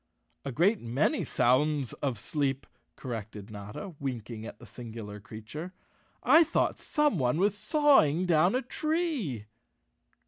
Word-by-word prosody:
"A 140 - -4
great 190 - +2
many 120 +6 0
sounds 140 +1 +2
of 130 -5 -1
sleep," 135 +4 -2 0.3
corrected 110 -4 -7
Notta, 105 - -7
winking 115 -4 -5
at - - -9
the - - -13
singular 110 -3 -8
creature. 120 - -8 0.5
"I 330 - +7
thought 330 - 0
someone 175 - +1
was 200 +3 +2
sawing 205 - +4
down 175 +4 +3
a 255 - 0
tree." 280 - -2
140 Hz, 125 wpm, -29 LUFS, -, 0.5 s, I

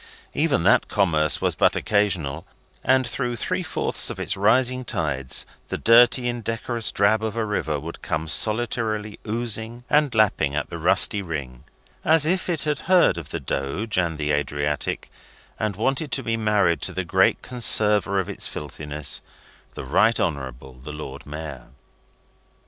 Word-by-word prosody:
Even 150 - +1
that 95 - +4
commerce 80 -7 +1
was - - +1
but - - +2
occasional, 90 -8 0 0.4
and 130 0 +3
through 120 0 -3
three 115 - -2
fourths - - -1
of - - -6
its 100 - -2
rising 125 +5 +2
tides 75 - -2 0.2
the - - -3
dirty 120 +2 +5
indecorous 115 -1 -2
drab 100 +2 +2
of 110 -1 -3
a 115 -1 -1
river 80 -8 -2
would 80 +4 -9
come 80 +1 -3
solitarily 110 +2 0
oozing 115 +1 -2
and 150 -4 +3
lapping 90 -9 +2
at 75 - -3
the - - -6
rusty 100 - +4
ring, 70 -9 -6 0.4
as 160 -1 +4
if 180 +3 0
it 160 -5 0
had 150 -2 -1
heard 180 - +5
of 75 -3 -10
the 85 - -4
Doge 70 - -2
and 85 -3 -1
the 75 -1 -1
Adriatic, 75 0 -2 0.5
and 110 -3 -2
wanted 135 - -1
to 135 - -1
be 115 0 -1
married 105 -6 +1
to - - -4
the - - -3
great - - +2
conserver 105 -5 +4
of 95 - -2
its - - -4
filthiness, 75 0 -5 0.5
the - - -6
Right 110 - +2
Honourable 65 -4 -4
the 75 - -8
Lord 70 -2 -8
Mayor. 75 -4 -8
105 Hz, 160 wpm, -23 LUFS, 75-120 Hz, 0.5 s, dirty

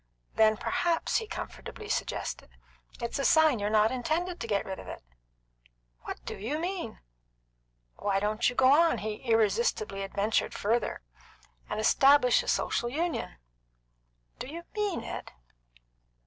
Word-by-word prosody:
"Then, 220 -1 +4
perhaps," 340 +7 0
he 445 - -3
comfortably 430 0 -7
suggested, 430 - -3 0.5
"it's 235 +2 -3
a - - 0
sign 315 -5 +5
you're 205 0 -1
not 215 0 +4
intended 325 +8 -2
to - - -4
get 205 -2 0
rid 190 -1 -5
of - - -10
it." - - -8 1.0
"What - - -5
do - - -5
you 235 +10 -3
mean?" 345 - -4 1.0
"Why 195 -1 0
don't 215 +4 +1
you 245 - -7
go 260 +1 +5
on," 330 +3 +4
he 210 0 -5
irresponsibly 215 -2 +1
adventured 200 +3 0
further, 230 +4 -1 0.7
"and 210 - -2
establish 270 +3 +5
a - - -10
Social 240 - 0
Union?" 320 - -2 1.0
"Do - - -5
you 335 +5 -7
mean 415 -4 -1
it?" - - -6
240 Hz, 140 wpm, -29 LUFS, 215-325 Hz, 1.0 s, sign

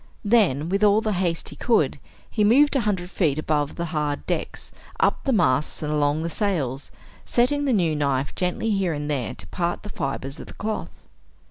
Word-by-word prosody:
Then, 195 - +3
with 200 +3 +1
all 205 0 +5
the 215 - -1
haste 175 -3 -1
he - - -9
could, 235 -3 +1 0.3
he 215 - 0
moved 280 +8 +5
a - - +4
hundred 180 -2 -2
feet 155 -8 +1
above 150 -2 -1
the 170 - -3
hard 150 -2 -1
decks, - - -4 0.3
up - - +1
the 270 - +2
masts 155 - +1
and 150 0 -1
along 150 +1 +1
the - - -1
sails, 145 - -1 0.3
setting 285 +4 +1
the 270 - +2
new 175 -8 +2
knife 140 -2 0
gently 185 +5 -1
here 195 -4 +1
and 145 0 -3
there 130 -5 -2
to - - -6
part 175 0 -2
the 210 - -7
fibers 135 -3 -4
of - - -9
the - - -11
cloth. 215 0 -5
175 Hz, 200 wpm, -24 LUFS, 145-210 Hz, 0.3 s, all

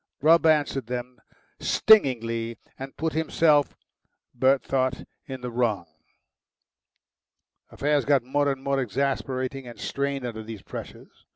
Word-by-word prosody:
Grubb 165 +2 +5
answered 145 -5 +2
them 125 -1 -6 0.4
stingingly, 115 - +3 0.2
and 135 0 -8
put 160 +1 -2
himself, 155 -2 +2 0.6
Bert 130 +2 +3
thought, 130 -1 -1 0.2
in 130 -2 -7
the 125 -1 -5
wrong. 115 -7 0 1.8
Affairs 145 -1 0
got 140 -3 +3
more 145 +3 +1
and 135 -1 -6
more 140 -1 0
exasperating 130 +2 -2
and 120 - -11
strained 140 -1 -2
under 115 -2 -5
these 110 -2 -9
pressures. - - -10
135 Hz, 120 wpm, -25 LUFS, 120-140 Hz, 1.8 s, Grubb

